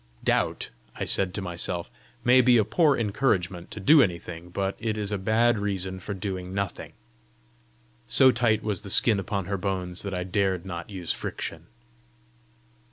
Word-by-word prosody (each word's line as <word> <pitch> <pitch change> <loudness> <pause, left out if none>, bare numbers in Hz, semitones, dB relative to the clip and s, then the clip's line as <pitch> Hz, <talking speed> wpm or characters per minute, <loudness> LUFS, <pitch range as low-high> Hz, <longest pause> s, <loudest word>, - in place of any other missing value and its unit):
"Doubt," - - 0 0.2
I - - -3
said 95 -2 +4
to 100 - -3
myself, 85 -1 -3 0.3
"may 125 +1 +6
be 125 -1 +5
a 110 - +3
poor 150 - +3
encouragement 100 -6 -1
to - - -8
do 145 +10 +6
anything, 85 -4 -3
but 95 +2 -2
it 110 -1 -2
is 105 -1 -3
a 105 - 0
bad 110 +3 +2
reason 95 -2 -2
for 100 +2 -6
doing 95 -1 -5
nothing." 100 -3 -4 1.1
So 130 -1 +7
tight 115 -3 +1
was 105 -3 -2
the 100 - -9
skin 105 +1 +3
upon 100 0 -3
her 100 +1 -3
bones 90 -2 -3
that 100 -2 -4
I 90 - -2
dared 95 -1 -1
not 85 -1 -6
use 90 -5 -3
friction. 80 +1 -6
100 Hz, 165 wpm, -26 LUFS, 90-110 Hz, 1.1 s, So